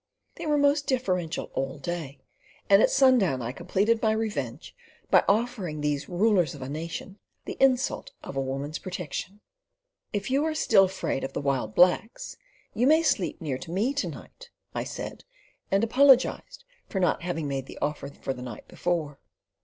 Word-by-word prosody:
They 335 - -5
were 300 -1 +3
most 285 0 +3
deferential 185 - -1
all 135 +2 -2
day, 150 -2 -5 0.5
and 200 +1 +6
at - - +5
sundown 250 - +4
I 115 - -3
completed 195 - 0
my 220 -1 +3
revenge 205 - -4 0.4
by - - +6
offering 205 -7 0
these 145 -1 -1
rulers 180 -5 +2
of 135 - -8
a 130 - -6
nation 165 +6 -6 0.3
the - - -5
insult 265 - +2
of - - -7
a 135 - 0
woman's 135 +3 -4
protection. 185 +2 -6 0.7
"If 205 +2 -3
you 275 +2 +2
are 315 0 -1
still 195 -10 +5
afraid 190 -7 -3
of 135 - -4
the - - -2
wild 135 -5 -1
blacks, 180 +6 +2 0.4
you 245 +3 +2
may 315 +3 +5
sleep 195 - 0
near 140 -5 -3
me 200 +11 0
to 285 - -1
night," - - -12 0.2
I - - -3
said, - - -7 0.5
and 195 +2 +2
apologised 270 - +3 0.2
for 190 - -2
not 180 - +1
having 165 -3 -3
made 135 -1 -3
the - - -10
offer 145 -1 -2
for 135 -1 -5
the 125 - -10
night 120 -4 -8
before. 160 -5 -2
185 Hz, 170 wpm, -27 LUFS, 145-235 Hz, 0.7 s, and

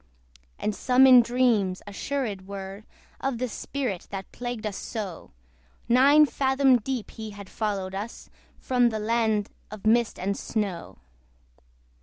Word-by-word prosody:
And 210 - -2
some 255 +5 +4
in 255 -2 +9
dreams 230 -6 +1
assured 205 -2 -4
were 195 +1 -7 0.3
Of 270 -3 -2
the 255 +2 -1
spirit 240 -4 -4
that 195 -1 -7
plagued 245 -2 -5
us 210 -2 -3
so: 200 -7 -6 0.6
Nine 280 +5 +6
fathom 265 -2 +3
deep 245 0 -4
he 220 -1 -7
had 200 -2 -11
followed 200 -3 -2
us 205 +4 -6 0.3
From 245 -2 +2
the 220 - -3
land 220 -1 0 0.2
of 215 0 -10
mist 235 +1 +3
and 200 +2 -2
snow. 200 -6 -4
220 Hz, 135 wpm, -26 LUFS, 200-250 Hz, 0.6 s, in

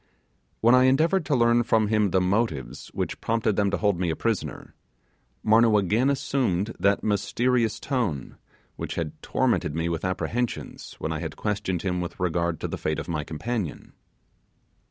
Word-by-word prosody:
When 115 +2 +5
I 130 0 +6
endeavoured 160 +6 +3
to 145 - +2
learn 120 -1 +4
from 110 -2 +2
him 105 -2 +2
the 95 - +2
motives 90 - -1
which - - -4
prompted 115 -2 +1
them 100 -1 +2
to 100 - 0
hold 100 -4 +1
me 90 -2 0
a 80 - 0
prisoner, 115 +1 -3 0.7
Marnoo 110 0 +5
again 105 +6 +2
presumed 120 -7 0
that 100 +2 +2
mysterious 115 +2 +1
tone 115 - -2 0.4
which - - -4
had 80 -3 -3
tormented 75 - 0
me 80 +1 -1
with 85 -1 -3
apprehension 110 +6 -2 0.2
when - - -3
I - - -3
had - - -5
questioned 100 -4 -2
him 90 -2 -1
with 85 - -6
regard 85 -2 0
to - - -1
the - - -5
fate 75 - -1
of - - -5
my 80 -4 -2
companion. 90 +3 -4
105 Hz, 170 wpm, -26 LUFS, 90-120 Hz, 0.7 s, I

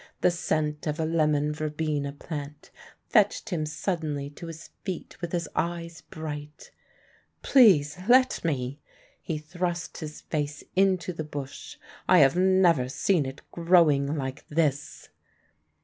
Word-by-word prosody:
The 180 - +4
scent 155 -3 -1
of 150 +2 -2
a 160 - +1
lemon 150 -2 +1
verbena 150 -2 -2
plant 145 0 -8 0.4
fetched 210 -1 +2
him 155 -4 -1
suddenly 150 -3 -3
to 170 +3 -9
his 165 0 -9
feet 185 -3 -5
with 175 -1 -4
his 170 -3 -1
eyes 170 -1 -3
bright. 150 -1 -8 0.7
"Please 180 - +5
let 255 +1 +5
me 140 -3 -2 0.2
" - - -29
he 160 - -3
thrust 170 +2 -4
his 155 -2 -7
face 150 -1 -3
into 185 -2 +2
the 160 - -4
bush; 145 -3 -7 0.3
"I - - +7
have 135 +2 +6
never 180 -8 +4
seen 150 +1 +1
it 135 +1 -9
growing 160 -4 +3
like 130 -2 -4
this." 150 -2 -1
155 Hz, 135 wpm, -27 LUFS, 145-175 Hz, 0.7 s, I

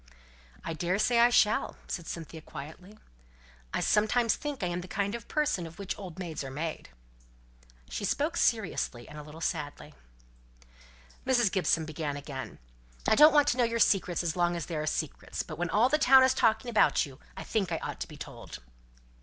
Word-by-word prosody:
"I 165 - -3
daresay 190 +8 +1
I 240 +1 +7
shall," 215 -3 +3
said 170 -3 -5
Cynthia, 165 -1 -7
quietly. 160 +8 -10 0.7
"I - - -1
sometimes 220 +2 +2
think 290 -7 -5
I'm 175 0 -1
the 180 - -9
kind 200 +2 -2
of 235 -2 -6
person 295 - 0
of 165 - -13
which 200 -2 -4
old 185 -4 -9
maids 170 -6 -5
are 135 - -6
made!" 155 +4 -5 1.0
She - - -5
spoke 295 - 0
seriously, 200 - 0
and 150 - -9
a - - -6
little 150 +2 -11
sadly. 150 -4 -4 1.3
Mrs. 245 -6 +3
Gibson 175 -4 +1
began 155 -2 -4
again. 140 -2 -7 0.5
"I - - +5
don't 300 +6 +8
want 290 -1 +4
to 245 - 0
know 250 - +3
your 230 0 0
secrets 185 -5 +2
as 165 -2 -1
long 175 -1 +1
as 170 -2 -3
they 170 - -5
are 155 0 -2
secrets; 155 -1 -3
but 155 -1 -9
when 175 -1 -1
all 220 +7 +4
the 305 +3 +2
town 265 -3 +7
is 260 0 +4
talking 220 +1 +2
about 220 - +4
you, 135 -1 -13 0.2
I - - -5
think 195 -6 -1
I 165 - 0
ought - - -6
to - - -3
be - - -12
told." - - -9
185 Hz, 190 wpm, -29 LUFS, 160-230 Hz, 1.3 s, don't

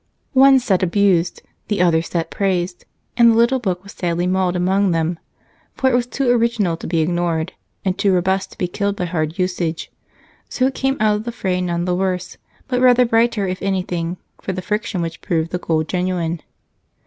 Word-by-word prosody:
One 270 0 +7
set 210 -8 +1
abused, 185 -2 +2 0.2
the 210 -3 -1
other 170 -2 +4
set 170 0 -3
praised, 185 -2 -1 0.3
and 235 -1 +6
the - - +2
little 235 +3 +3
book 185 -6 -2
was 200 - -11
sadly 175 0 -1
mauled 185 0 +1
among 190 +2 +2
them, 165 0 0 0.6
for 260 0 +2
it - - -1
was 245 0 +1
too 270 +1 -2
original 230 -7 +1
to - - -7
be 165 -1 +1
ignored, 170 +1 -1 0.3
and 185 -1 +1
too 200 0 +2
robust 190 +1 +1
to - - -15
be 180 - -1
killed 200 +3 -2
by 180 - -2
hard 160 -1 -2
usage, 180 -3 -2 0.6
so 255 - 0
it 265 - +1
came 270 +1 0
out 210 -1 +3
of 210 - -6
the 235 - -3
fray 185 -5 -1
none 175 -1 -1
the 180 - 0
worse 180 -1 -2 0.3
but 250 -1 0
rather 250 -1 +6
brighter, 230 -3 +2
if 185 0 -4
anything, 180 -3 -2 0.2
for 190 - -3
the 185 0 -5
friction 210 -3 -2
which 165 0 -6
proved 165 -3 -1
the 180 - -2
gold 160 -2 0
genuine. 180 -3 -1
185 Hz, 195 wpm, -20 LUFS, 175-215 Hz, 0.6 s, One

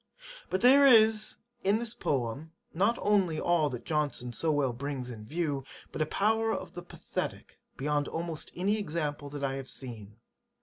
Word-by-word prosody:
But 185 - 0
there 270 +3 +7
is 220 -5 +5 0.3
in 200 +2 +3
this 235 -1 -3
Poem 135 - -2 0.2
not 200 +8 +2
only 195 -6 +2
all 170 -4 +2
that 125 -3 -7
Johnson 145 -6 -1
so 160 +6 0
well 140 -4 +1
brings 130 0 -4
in 110 -3 -9
view, 150 -2 -1 0.3
but - - -4
a 155 - +2
power 225 +4 +1
of - - -4
the 175 - -6
Pathetick - - -6 0.2
beyond 145 +1 0
almost 165 -1 -5
any 200 +4 +1
example 150 -5 -3
that 145 0 -6
I 135 -1 0
have 135 -1 -7
seen. 110 -5 -9
155 Hz, 170 wpm, -30 LUFS, 135-200 Hz, 0.3 s, there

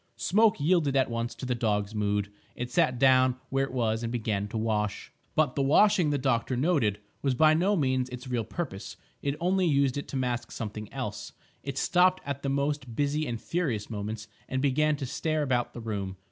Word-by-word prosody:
Smoke 215 0 +3
yielded 150 -2 +2
at 130 -2 +2
once 115 0 -3
to - - -7
the 125 - 0
dog's 105 -3 -1
mood; 105 -1 -1 0.2
it 125 0 -5
sat 125 0 +2
down 130 -1 +5
where 135 0 +1
it - - -9
was 115 -3 0
and 115 -1 -3
began 105 -4 -1
to 110 - -5
wash. 105 -2 -2 0.2
But 155 -1 +2
the 140 - -1
washing, 165 +4 +4
the 145 - +1
doctor 130 -2 0
noted, 130 - +1 0.2
was 135 -2 +1
by 155 +4 +5
no 185 +6 +2
means 130 -5 +1
its 125 +1 -8
real 120 -3 -1
purpose; 110 - -6 0.2
it 140 0 -1
only 185 +1 +2
used 140 -2 +2
it - - -7
to - - -7
mask 120 -2 -2
something 110 -1 -6
else; - - -5 0.3
it 140 -1 -5
stopped 180 +3 +3
at 140 0 -4
the 140 - -2
most 140 -3 -1
busy 145 +2 0
and 115 -2 -3
furious 130 - -2
moments 105 +1 -5 0.2
and 130 - -1
began 150 +3 +2
to 140 -2 -4
stare 155 +3 -1
about 125 -4 0
the 120 - -6
room. 100 -4 -4
130 Hz, 200 wpm, -28 LUFS, 115-145 Hz, 0.3 s, down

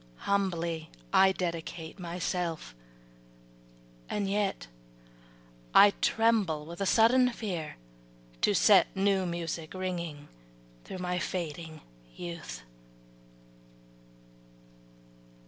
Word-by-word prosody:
Humbly 170 -5 -1 0.2
I 190 0 +6
dedicate 170 -1 -4
myself, 175 - -3 1.4
and 205 -1 -1
yet 200 - -1 1.1
I 205 - +9
tremble 215 -10 +2
with 170 +4 -8
a 195 - +1
sudden 250 +5 +5
fear 185 -10 -4 0.7
to - - +3
set - - +6
New 195 -1 +2
music 170 -1 -4
ringing 170 -6 -4 0.6
through - - -7
my 180 0 -2
fading 160 -3 -4 0.3
youth. 170 - -7
180 Hz, 80 wpm, -30 LUFS, 165-195 Hz, 1.4 s, I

